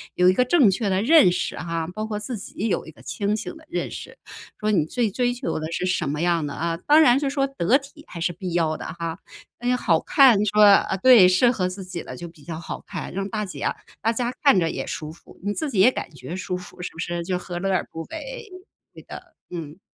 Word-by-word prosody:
有 180 Hz, -, +4 dB
一 -, -, +4 dB
个 250 Hz, -, +3 dB
正 250 Hz, -, +5 dB
确 200 Hz, +2 st, -1 dB
的 190 Hz, 0 st, +1 dB
认 255 Hz, -, +6 dB
识 -, -, -2 dB
哈， 165 Hz, -1 st, -3 dB
包 215 Hz, +1 st, -3 dB
括 215 Hz, -1 st, -3 dB
自 225 Hz, +4 st, -4 dB
己 205 Hz, +2 st, -4 dB
有 200 Hz, -, -1 dB
一 -, -, -9 dB
个 -, -, -19 dB
清 205 Hz, 0 st, -1 dB
醒 235 Hz, +9 st, -6 dB
的 320 Hz, -, -17 dB
认 345 Hz, -, -3 dB
识。 -, -, -9 dB, 0.4 s
说 215 Hz, 0 st, 0 dB
你 170 Hz, -7 st, +2 dB
最 225 Hz, +5 st, -1 dB
追 245 Hz, +3 st, 0 dB
求 250 Hz, -, -3 dB
的 155 Hz, +1 st, -5 dB
是 175 Hz, -, -2 dB
什 170 Hz, -5 st, 0 dB
么 150 Hz, +2 st, -2 dB
样 170 Hz, -3 st, +1 dB
的 145 Hz, -, -5 dB
啊， 165 Hz, 0 st, -2 dB
当 300 Hz, +2 st, +7 dB
然 255 Hz, -3 st, +5 dB
是 280 Hz, -1 st, -1 dB
说 275 Hz, 0 st, 0 dB
得 260 Hz, -3 st, +2 dB
体 295 Hz, +2 st, -14 dB
还 170 Hz, -, -9 dB
是 175 Hz, +1 st, 0 dB
必 180 Hz, 0 st, -6 dB
要 160 Hz, -2 st, +1 dB
的 -, -, -8 dB
哈。 170 Hz, +1 st, -5 dB, 0.4 s
那 245 Hz, +1 st, +1 dB
好 170 Hz, -9 st, +2 dB
看 260 Hz, -7 st, +5 dB
你 210 Hz, -, +1 dB
说 210 Hz, +1 st, +4 dB
啊 200 Hz, -1 st, +5 dB
对， 225 Hz, -2 st, +7 dB
适 185 Hz, +7 st, +4 dB
合 190 Hz, -7 st, -1 dB
自 185 Hz, +1 st, -6 dB
己 180 Hz, -2 st, -6 dB
的 130 Hz, -, -8 dB
就 170 Hz, +6 st, -8 dB
比 165 Hz, -3 st, -19 dB
较 165 Hz, -2 st, -6 dB
好 165 Hz, -, -7 dB
看， -, -, -6 dB
让 195 Hz, +1 st, -3 dB
大家 210 Hz, -2 st, -4 dB
啊 -, -, -1 dB, 0.3 s
大 225 Hz, +3 st, +1 dB
家 240 Hz, +1 st, -1 dB
看 275 Hz, -7 st, +6 dB
着 165 Hz, -2 st, 0 dB
也 -, -, -5 dB
舒 155 Hz, 0 st, -5 dB
服， 165 Hz, -, -17 dB
你 205 Hz, -, -1 dB
自 310 Hz, +7 st, -3 dB
己 220 Hz, -8 st, -2 dB
也 250 Hz, -, +7 dB
感 -, -, -5 dB
觉 160 Hz, -, -8 dB
舒 185 Hz, -1 st, -3 dB
服， 180 Hz, 0 st, -11 dB
是 -, -, -4 dB
不 165 Hz, -, -13 dB
是？ 175 Hz, -1 st, -3 dB
就 180 Hz, 0 st, -1 dB
何 175 Hz, -1 st, -6 dB
乐 195 Hz, +2 st, -1 dB
而 185 Hz, -, 0 dB
不 165 Hz, -, -6 dB
为。 -, -, -8 dB, 0.5 s
对 -, -, -13 dB
的， -, -, -11 dB, 0.2 s
嗯。 165 Hz, -1 st, -7 dB
190 Hz, 280 characters per minute, -23 LUFS, 170-245 Hz, 0.5 s, 当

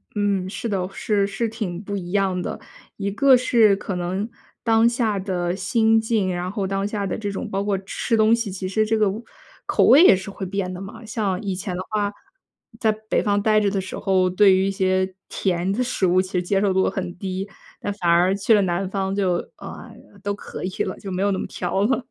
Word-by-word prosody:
嗯， 200 Hz, -3 st, 0 dB
是 230 Hz, -, -4 dB
的， 185 Hz, -3 st, -1 dB
是 210 Hz, -6 st, +1 dB
是 220 Hz, +3 st, -2 dB
挺 195 Hz, -6 st, -4 dB
不 200 Hz, 0 st, -4 dB
一 175 Hz, -2 st, -6 dB
样 195 Hz, -2 st, +1 dB
的。 -, -, -4 dB, 0.4 s
一 200 Hz, -1 st, -2 dB
个 265 Hz, +5 st, +5 dB
是 235 Hz, -5 st, +4 dB
可 195 Hz, -1 st, -5 dB
能 185 Hz, +5 st, -2 dB, 0.3 s
当 225 Hz, 0 st, +4 dB
下 235 Hz, -3 st, 0 dB
的 180 Hz, -2 st, -2 dB
心 225 Hz, +3 st, +3 dB
境， 220 Hz, -4 st, 0 dB
然 180 Hz, +1 st, -3 dB
后 200 Hz, -1 st, -2 dB
当 195 Hz, +1 st, -1 dB
下 205 Hz, -1 st, -3 dB
的 180 Hz, -, -3 dB
这 205 Hz, -2 st, -3 dB
种 200 Hz, +2 st, -5 dB
包 195 Hz, 0 st, -1 dB
括 205 Hz, -1 st, 0 dB
吃 200 Hz, +4 st, -2 dB
东 220 Hz, +1 st, +5 dB
西， 230 Hz, -4 st, -3 dB
其 185 Hz, 0 st, -4 dB
实 215 Hz, +3 st, +1 dB
这 220 Hz, +1 st, +1 dB
个 215 Hz, -2 st, +3 dB
味 215 Hz, +5 st, -5 dB, 0.4 s
口 -, -, +2 dB
味 295 Hz, +6 st, +8 dB
也 285 Hz, -, +8 dB
是 190 Hz, +2 st, -6 dB
会 195 Hz, 0 st, -6 dB
变 190 Hz, 0 st, -3 dB
的 180 Hz, -, -6 dB
嘛。 205 Hz, +4 st, -9 dB
像 215 Hz, -4 st, -2 dB
以 195 Hz, -3 st, -3 dB
前 180 Hz, 0 st, -4 dB
的 180 Hz, -, -3 dB
话， 205 Hz, -1 st, -1 dB, 0.7 s
在 220 Hz, -, +3 dB
北 215 Hz, 0 st, -2 dB
方 205 Hz, -1 st, +1 dB
待 215 Hz, +1 st, +4 dB
着 205 Hz, -2 st, +1 dB
的 195 Hz, -1 st, -1 dB
时 190 Hz, -, -7 dB
候， 185 Hz, -1 st, +2 dB
对 190 Hz, +1 st, +5 dB
于 190 Hz, +1 st, +2 dB
一 -, -, 0 dB
些 190 Hz, -1 st, 0 dB
甜 180 Hz, 0 st, -1 dB
的 235 Hz, +6 st, 0 dB
食 245 Hz, -6 st, -1 dB
物 185 Hz, +1 st, +4 dB
其 185 Hz, 0 st, -8 dB
实 180 Hz, -1 st, +1 dB
接 195 Hz, +2 st, +1 dB
受 200 Hz, -, +2 dB
度 190 Hz, 0 st, +2 dB
很 180 Hz, -2 st, -5 dB
低。 190 Hz, +1 st, -4 dB, 0.3 s
但 205 Hz, -, -3 dB
反 180 Hz, -4 st, -1 dB
而 175 Hz, +3 st, +4 dB
去 200 Hz, +3 st, +2 dB
了 210 Hz, -, +5 dB
南 185 Hz, +1 st, -1 dB
方 195 Hz, 0 st, -2 dB
就， 190 Hz, -3 st, +1 dB, 0.2 s
呃， -, -, -9 dB, 0.3 s
都 205 Hz, -1 st, -1 dB
可 -, -, -8 dB
以 185 Hz, -, -1 dB
了， 185 Hz, -, -4 dB
就 195 Hz, -, -7 dB
没 185 Hz, +1 st, -1 dB
有 200 Hz, -, +2 dB
那 190 Hz, -, -1 dB
么 -, -, -4 dB
挑 185 Hz, +2 st, -2 dB
了。 260 Hz, +2 st, 0 dB
195 Hz, 250 characters per minute, -22 LUFS, 185-215 Hz, 0.7 s, 味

